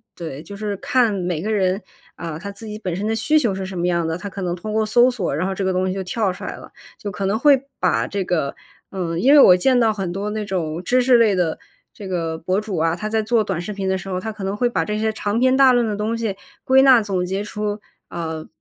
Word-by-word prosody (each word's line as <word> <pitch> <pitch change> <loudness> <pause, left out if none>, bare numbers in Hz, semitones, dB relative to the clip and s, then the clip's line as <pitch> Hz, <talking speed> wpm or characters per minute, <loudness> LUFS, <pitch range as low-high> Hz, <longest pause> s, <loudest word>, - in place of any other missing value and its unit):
对， 160 -3 -7
就 200 - -9
是 205 -1 -4
看 245 +1 +2
每 180 -4 -2
个 215 - -2
人， 195 -1 +1 0.3
啊， 165 -3 -6
他 200 +4 -7
自 210 +2 -9
己 210 - -6
本 185 -5 -4
身 200 +4 -3
的 225 - 0
需 250 +8 +3
求 230 -9 0
是 190 - -4
什 185 -2 -6
么 175 - 0
样 170 -2 +1
的， 160 - -1
他 200 - -6
可 195 0 -6
能 175 0 -1
通 215 +5 -6
过 220 0 +1
搜 240 +3 +5
索， 205 - -2
然 180 +5 -1
后 190 - -3
这 195 - -2
个 190 - +1
东 185 +1 0
西 185 - -1
就 195 - -3
跳 195 +1 -1
出 180 - -10
来 - - -5
了。 - - -13 0.3
就 205 - -5
可 195 - -4
能 200 +3 0
会 275 -1 +5 0.2
把 - - +1
这 200 -1 -3
个 160 -6 -1 0.4
嗯， 170 -3 -3
因 270 +9 +5
为 295 - +8
我 180 -9 +8
见 250 +6 +3
到 225 -2 +3
很 195 -4 -3
多 200 +3 -3
那 215 0 -3
种 170 -3 -3
知 250 +7 +2
识 250 -1 +5
类 225 -3 +4
的 175 -3 0 0.4
这 200 - -9
个 165 -3 -2
博 185 +4 -1
主 210 -4 -4
啊， 165 +1 +1
他 215 +4 -4
在 220 0 +1
做 220 0 +2
短 170 - -3
视 210 +4 -5
频 195 -1 -3
的 190 - +1
时 185 - -9
候， 185 -1 -2
他 220 +4 -4
可 210 -2 -9
能 195 +1 -2
会 245 +2 +2
把 - - 0
这 210 0 -2
些 220 0 +1
长 210 +1 -1
篇 260 +1 +4
大 270 -1 +7
论 240 -1 +3
的 210 - -2
东 215 +3 -2
西 220 -4 -2 0.3
归 265 0 +5
纳、 260 -3 +7
总 195 -4 -1
结 190 +3 -2
出， 210 0 -4 0.3
呃， 160 -2 -5
200 Hz, 305 characters per minute, -21 LUFS, 180-220 Hz, 0.4 s, 为